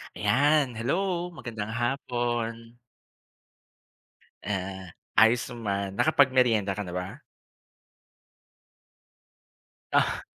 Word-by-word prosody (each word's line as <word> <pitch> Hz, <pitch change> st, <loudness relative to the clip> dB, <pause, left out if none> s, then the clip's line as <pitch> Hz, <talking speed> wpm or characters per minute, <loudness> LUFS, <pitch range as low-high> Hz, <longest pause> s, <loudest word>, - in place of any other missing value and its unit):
Ayan, 145 Hz, 0 st, +3 dB
hello 175 Hz, +8 st, -1 dB
magandang 110 Hz, -7 st, -5 dB
hapon. 120 Hz, -2 st, -2 dB, 1.7 s
Ah, 95 Hz, -2 st, -4 dB, 0.2 s
ayos 115 Hz, +2 st, +5 dB
naman, 100 Hz, -5 st, -3 dB
nakapagmerienda 125 Hz, -9 st, +3 dB
ka 105 Hz, -, -3 dB
na 90 Hz, -, -7 dB
ba? 90 Hz, +1 st, -5 dB, 2.7 s
Ah. -, -, +1 dB
115 Hz, 70 wpm, -27 LUFS, 100-130 Hz, 2.7 s, ayos